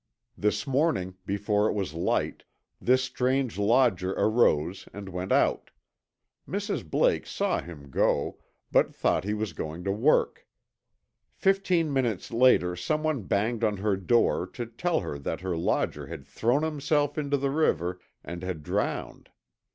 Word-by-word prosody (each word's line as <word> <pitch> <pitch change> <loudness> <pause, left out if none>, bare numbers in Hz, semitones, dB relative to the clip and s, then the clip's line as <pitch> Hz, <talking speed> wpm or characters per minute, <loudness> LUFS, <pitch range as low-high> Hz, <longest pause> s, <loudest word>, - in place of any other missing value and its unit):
This 105 0 0
morning, 135 - +1
before 105 +1 +1
it - - 0
was 95 -7 -3
light, 85 - -1 0.4
this 130 +1 +3
strange 130 -2 0
lodger 100 -4 +3
arose 95 -5 +2
and 100 -1 -8
went 90 0 -4
out. - - +2 0.8
Mrs. - - -2
Blake - - +2
saw - - 0
him 75 -5 -11
go, - - +1 0.3
but - - +3
thought - - +1
he 105 +1 -1
was 105 -4 -3
going 80 +3 -5
to 100 - 0
work. 155 - +2 0.9
Fifteen 185 -6 +2
minutes 120 -8 -1
later 115 -7 +4
someone 155 - -1
banged 110 +5 0
on 105 -2 +1
her 100 +1 +1
door 95 -1 +2
to 120 +5 -6
tell 160 +9 -1
her 70 - -5
that 70 - -4
her 95 -2 -2
lodger 80 - -1
had 80 -5 -8
thrown 120 - +1
himself 145 -1 0
into 145 -2 0
the 135 0 -1
river 90 - +1 0.2
and 85 0 -7
had 90 -4 -4
drowned. - - -3
105 Hz, 145 wpm, -27 LUFS, 90-135 Hz, 0.9 s, later